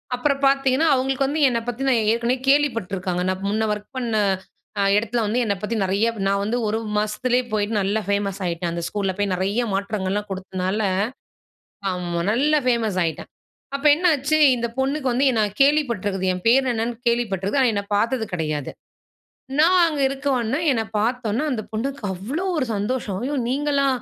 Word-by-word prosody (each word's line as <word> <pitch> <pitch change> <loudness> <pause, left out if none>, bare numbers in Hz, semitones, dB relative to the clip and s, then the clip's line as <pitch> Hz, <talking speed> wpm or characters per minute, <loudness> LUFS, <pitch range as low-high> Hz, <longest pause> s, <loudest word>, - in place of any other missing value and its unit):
அப்புறம் 275 +2 0
பார்த்தீங்கன்னா 275 +3 +2
அவங்களுக்கு 265 +1 +1
வந்து 300 +2 -1
என்னை 235 -1 0
பத்தின 260 +2 0 0.2
ஏற்கனவே 235 +2 +1
கேள்வி 290 +1 +5
பட்ருக்காங்க. 185 -3 -3
நான் 190 +1 -3
முன்னே 220 +1 0
ஒர்க் 210 +5 -9
பண்ண 235 -3 -2 0.7
அ - - +3
இடத்தில 230 +2 0
வந்து 220 +4 0
என்னை 200 -1 0
பத்தி 220 +2 -2
நெறைய 195 +4 +1 0.2
நான் 200 0 +1
வந்து 230 +4 -1
ஒரு 220 +1 0 0.2
மாசத்திலயே 240 +4 +1
போயிட்டு 210 +1 -1
நல்லா 200 +3 0
ஃபேமஸ் 200 -1 -1
ஆயிட்டேன். 170 0 -2
அந்த 170 0 -3
ஸ்கூல்ல 195 0 -1
போய் 205 -1 0
நெறைய 200 +6 0
மாற்றங்கள்லாம் 200 +1 -2
கொடுத்தனால 190 +1 -3 1.1
ஆமா 175 -1 -3
நல்லா 295 +6 +3
ஃபேமஸ் 230 -6 +1
ஆயிட்டேன். 160 -2 -4 0.5
அப்போ 280 +2 -1
என்னாச்சு, 310 -3 +2 0.2
இந்த 235 -1 -2
பொண்ணுக்கு 270 0 0
வந்து 260 +3 +2
என்னை 225 -3 +1 0.2
கேள்விப்பட்டிருக்குது. 235 -10 +2
என் 180 0 -5
பேர் 260 +2 +4
என்னன்னு 230 +1 -2
கேள்விப்பட்டிருக்குது. 225 0 0
ஆனா 245 - +4
என்னை 200 0 -2
பார்த்தது 230 +2 +1
கிடையாது. 155 -4 -2 0.9
நான் 360 +3 +5
அங்க 300 -3 -2
இருக்கவுமே, 270 -1 -1
என்னை 225 -2 -1
பார்த்தவுடனே 235 +2 -1
அந்த 220 -4 -2
பொண்ணுக்கு 265 +5 -3
அவ்ளோ 265 - -4
ஒரு 265 - +1
சந்தோஷம். 205 -1 -2
"ஐயோ! 285 +3 -2 0.2
நீங்களா? 280 0 +1
230 Hz, 160 wpm, -22 LUFS, 200-265 Hz, 1.1 s, கேள்வி